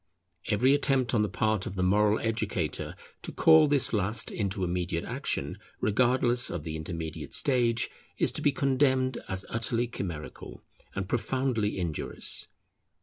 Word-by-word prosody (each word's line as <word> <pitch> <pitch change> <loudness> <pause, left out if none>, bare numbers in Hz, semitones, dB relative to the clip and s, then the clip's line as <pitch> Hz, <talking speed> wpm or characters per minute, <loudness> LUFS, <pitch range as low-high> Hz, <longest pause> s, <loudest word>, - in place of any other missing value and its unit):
Every 125 +6 +4
attempt 135 -3 +2
on 110 - +3
the 105 - 0
part 105 +1 0
of 95 - -6
the 90 - -1
moral 105 +3 +3
educator 105 -8 -2 0.3
to - - -5
call 160 -1 +6
this 140 -4 +3
last 105 +2 0
into 100 -2 -2
immediate 90 -1 -2
action, - - -3 0.2
regardless 120 +2 +2
of 85 -4 -4
the 80 0 -5
intermediate 80 -2 -5
stage, 120 -4 +2 0.3
is - - +2
to - - -4
be 145 - +3
condemned 130 -1 +1
as 95 0 -3
utterly 115 +1 0
chimerical 85 -9 -7 0.3
and 100 -1 -3
profoundly 115 -1 -1
injurious. 85 -4 -2
110 Hz, 145 wpm, -28 LUFS, 90-130 Hz, 0.3 s, call